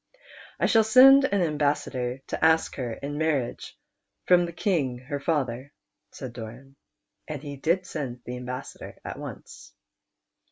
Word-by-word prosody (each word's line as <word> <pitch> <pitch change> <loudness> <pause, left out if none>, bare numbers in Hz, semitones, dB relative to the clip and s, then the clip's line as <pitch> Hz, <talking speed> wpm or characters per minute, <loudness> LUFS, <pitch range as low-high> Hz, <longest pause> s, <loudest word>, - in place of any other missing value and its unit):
" - - -19
I - - +2
shall 225 -1 +5
send 265 +5 +8
an 200 -7 +1
ambassador 145 -5 -1
to - - -3
ask 160 0 +3
her 125 -4 -3
in 145 +5 -5
mar 160 - +1
riage 125 -4 -4 0.5
from 175 -1 +4
the - - -6
King 160 -8 0
her 140 +3 -5
father," 140 -4 -2 0.4
said 130 -3 -8
Doran. 120 +4 -10 0.5
And 150 -2 -6
he 145 -1 -6
did 170 +6 0
send 130 -8 -5
the 125 - -5
ambassador 125 +1 -7
at - - -6
once. - - -10
145 Hz, 155 wpm, -26 LUFS, 125-165 Hz, 0.5 s, send